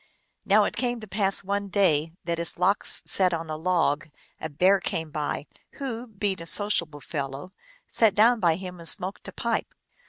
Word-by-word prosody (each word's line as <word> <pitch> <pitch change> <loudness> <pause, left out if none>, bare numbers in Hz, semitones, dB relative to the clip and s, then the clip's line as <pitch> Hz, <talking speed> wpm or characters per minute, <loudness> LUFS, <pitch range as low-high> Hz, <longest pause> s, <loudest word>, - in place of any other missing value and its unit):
Now - - +5
it - - -2
came 245 -1 -1
to 215 - -9
pass 195 0 0
one 200 +1 -2
day 165 -6 +2
that 170 0 -2
as 170 - 0
Lox 185 +3 +2
sat 185 -3 +3
on 165 -1 -5
a - - -2
log 165 -1 0 0.3
a 160 - -4
bear 185 +7 +4
came 160 -3 -3
by, 150 -1 -3 0.3
who, 250 -4 -5
being 205 -4 -2
a 165 - -6
sociable 170 -7 +2
fellow, 140 +5 -5 0.3
sat 220 -3 +3
down 230 +3 +5
by 170 -5 +3
him 180 0 -7
and 165 - -6
smoked 190 0 -2
a - - -6
pipe. - - -2
185 Hz, 185 wpm, -26 LUFS, 160-205 Hz, 0.3 s, Now